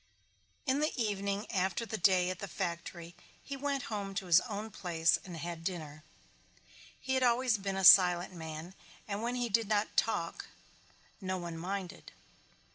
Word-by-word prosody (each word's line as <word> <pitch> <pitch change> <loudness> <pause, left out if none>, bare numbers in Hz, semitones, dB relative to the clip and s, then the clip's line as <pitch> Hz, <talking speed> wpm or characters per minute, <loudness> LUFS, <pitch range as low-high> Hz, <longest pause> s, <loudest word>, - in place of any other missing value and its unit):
In 270 0 +1
the 305 +1 +1
evening 200 -1 -1
after 190 +2 0
the 220 - -4
day 185 -2 +3
at 185 - -7
the 200 - -5
factory 170 -2 -5 0.3
he 275 - -6
went 275 -1 -2
home 200 -3 -4
to 195 -1 -2
his 175 0 +6
own 215 +1 -5
place 170 -4 +1
and 175 -3 -8
had 170 0 -6
dinner. 155 -4 -5 1.0
He 265 - -2
had 260 - +2
always 245 -2 +3
been 195 -1 -3
a 195 - -1
silent 180 -1 +7
man 160 +1 -7 0.3
and 205 0 -3
when 240 +2 -2
he 245 -1 -1
did 225 0 +1
not 210 0 0
talk 170 -7 0 0.8
no 185 0 -2
one 170 -2 -6
minded. 185 +2 -6
195 Hz, 165 wpm, -32 LUFS, 175-220 Hz, 1.0 s, silent